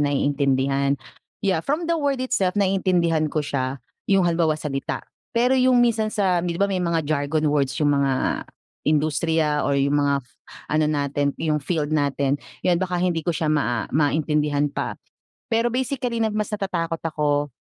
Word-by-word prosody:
naiintindihan. 140 -1 +1 0.5
Yeah, 190 -5 +2
from 305 +4 -1
the 335 - +1
word 280 -3 0
itself, 195 -7 0
naiintindihan 180 -5 +2
ko 155 - -1
siya, 130 -1 -2 0.3
yung 195 -2 +4
halimbawa, 165 -2 +2
salita. 135 -3 -4 0.3
Pero 245 +2 +4
yung 255 -1 +4
minsan 220 -2 +1
sa 190 -5 +1
'di 170 -1 -2
ba 200 - +2
may 195 -2 -1
mga 170 -2 0
jargon 150 +1 0
words 140 -3 +1
yung 145 -1 +3
mga 135 -2 0 0.5
industriya 155 0 +1
or 140 -1 +1
yung 140 +1 +2
mga 140 -2 +1 0.5
ano 155 0 +3
natin, 145 -1 0
yung 155 -2 0
field 155 0 -2
natin, 140 -1 +1 0.2
yun, 175 -1 +3
baka 180 -1 -1
hindi 175 -2 0
ko 165 - -1
siya 160 -1 -1
ma 120 -6 0
ah, - - -10
maintindihan 150 0 +1
pa. - - -3 0.5
Pero 230 +1 +2
basically 250 -2 -1
na 220 - +1
mas 210 0 -1
natatakot 170 -5 -2
ako 145 -2 0
155 Hz, 165 wpm, -23 LUFS, 145-190 Hz, 0.5 s, yung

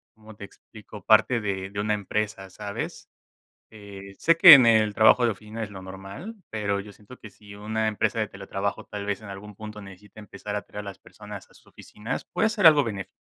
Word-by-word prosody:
¿cómo 110 -1 -15
te 100 - -9
explico? 105 0 -15
Parte 115 +2 +4
de 100 -3 -4
de 100 +1 -7
una 105 +1 0
empresa, 105 -1 -3
¿sabes? 100 +2 -7 0.6
Eh, 100 -2 -12
sé 165 0 +3
que 170 -2 +11
en 130 -4 +6
el 110 -2 +3
trabajo 120 +2 +5
de 115 - +2
oficina 110 +2 -7
es 105 - -10
lo 95 -1 -10
normal, 95 - -9
pero 100 -2 -2
yo 100 +1 -9
siento 105 +5 -16
que 110 - -12
si 100 0 -15
una 110 +1 -2
empresa 110 +1 -1
de 105 - -1
teletrabajo 100 +1 -5
tal 105 -1 -7
vez 105 0 -3
en 110 - -12
algún 100 +1 -10
punto 105 0 -9
necesita 100 +2 -14
empezar 105 0 -8
a 105 - -3
traer 105 - -9
a - - -7
las 95 - -16
personas - - -12
a - - -23
sus - - -22
oficinas, 105 +2 -7
puede 220 - 0
ser 210 -6 +6
algo 150 -3 +4
benéf 100 -4 -5
105 Hz, 220 wpm, -25 LUFS, 100-110 Hz, 0.6 s, que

